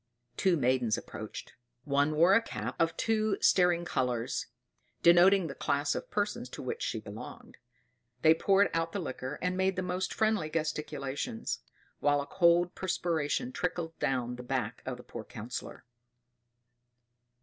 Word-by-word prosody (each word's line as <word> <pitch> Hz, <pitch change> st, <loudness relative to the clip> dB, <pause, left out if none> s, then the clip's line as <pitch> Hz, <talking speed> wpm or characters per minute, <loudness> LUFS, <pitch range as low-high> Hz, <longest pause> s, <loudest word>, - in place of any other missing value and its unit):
Two 185 Hz, -3 st, +2 dB
maidens 125 Hz, -4 st, +2 dB
approached. -, -, -8 dB, 0.3 s
One 145 Hz, +1 st, +1 dB
wore 170 Hz, +5 st, +6 dB
a 230 Hz, -, +6 dB
cap 230 Hz, -, -5 dB
of 165 Hz, 0 st, +1 dB
two 215 Hz, -2 st, +1 dB
staring 175 Hz, -2 st, +4 dB
colors, 125 Hz, -6 st, -1 dB, 0.6 s
denoting 180 Hz, +2 st, +6 dB
the 145 Hz, -, -4 dB
class 145 Hz, +1 st, 0 dB
of -, -, -5 dB
persons 210 Hz, +4 st, -2 dB
to -, -, -8 dB
which 465 Hz, +1 st, -4 dB
she -, -, -2 dB
belonged. -, -, -10 dB, 0.7 s
They 160 Hz, 0 st, +8 dB
poured 195 Hz, +4 st, +3 dB
out 165 Hz, 0 st, -1 dB
the 200 Hz, -, -1 dB
liquor, 130 Hz, -3 st, -5 dB
and 180 Hz, 0 st, 0 dB
made 190 Hz, 0 st, +1 dB
the 185 Hz, -, -2 dB
most 180 Hz, +1 st, -2 dB
friendly 215 Hz, -8 st, +1 dB
gesticulations; 150 Hz, -6 st, -3 dB, 0.4 s
while 145 Hz, 0 st, +3 dB
a 140 Hz, -, -3 dB
cold 175 Hz, +2 st, +3 dB
perspiration 175 Hz, -, -1 dB
trickled 175 Hz, -6 st, -3 dB
down 125 Hz, -2 st, -1 dB
the -, -, -6 dB
back 125 Hz, -2 st, -3 dB
of 130 Hz, -1 st, -3 dB
the 125 Hz, -, -12 dB
poor 115 Hz, -, -8 dB
Councillor. 115 Hz, +3 st, -7 dB
165 Hz, 150 wpm, -31 LUFS, 135-185 Hz, 0.7 s, They